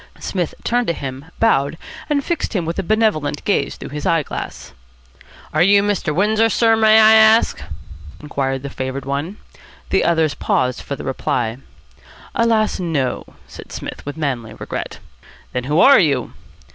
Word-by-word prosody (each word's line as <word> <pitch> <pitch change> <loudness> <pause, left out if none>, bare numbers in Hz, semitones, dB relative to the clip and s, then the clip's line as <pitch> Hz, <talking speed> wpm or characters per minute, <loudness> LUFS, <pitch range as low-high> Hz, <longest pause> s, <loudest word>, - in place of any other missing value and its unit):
Psmith 180 -4 -3
turned 245 0 0
to 170 - +1
him, 135 -2 -7
bowed, 140 -9 +2 0.3
and 285 -2 0
fixed 340 -7 -2
him 175 -4 0
with 165 +3 -3
a - - +2
benevolent 190 -8 0
gaze 195 -9 0
through - - -8
his 145 +1 -6
eye 165 -2 +2
glass. - - -7 0.8
"Are - - +2
you 200 +2 +5
Mr. 205 -6 -1
Windsor, 215 +7 +2
sir, 225 0 +3
may 220 0 +5
I 220 0 +7
ask?" 220 +1 +5 0.6
inquired 135 -2 -3
the 140 - -6
favoured 130 +1 -5
one. 145 +9 -3 0.5
The - - +3
others 160 -3 +2
paused 125 0 -1
for 140 - -5
the - - -9
reply. 120 -3 -2 0.8
"Alas! 230 -5 +1
no," 155 -8 -1 0.2
said - - -12
Psmith - - -7
with 145 +2 -7
manly 120 -8 -3
regret. - - -6 0.6
"Then 125 -1 -2
who 150 +4 +1
are 275 +1 +7
you?" 140 - 0
165 Hz, 160 wpm, -19 LUFS, 140-215 Hz, 0.8 s, I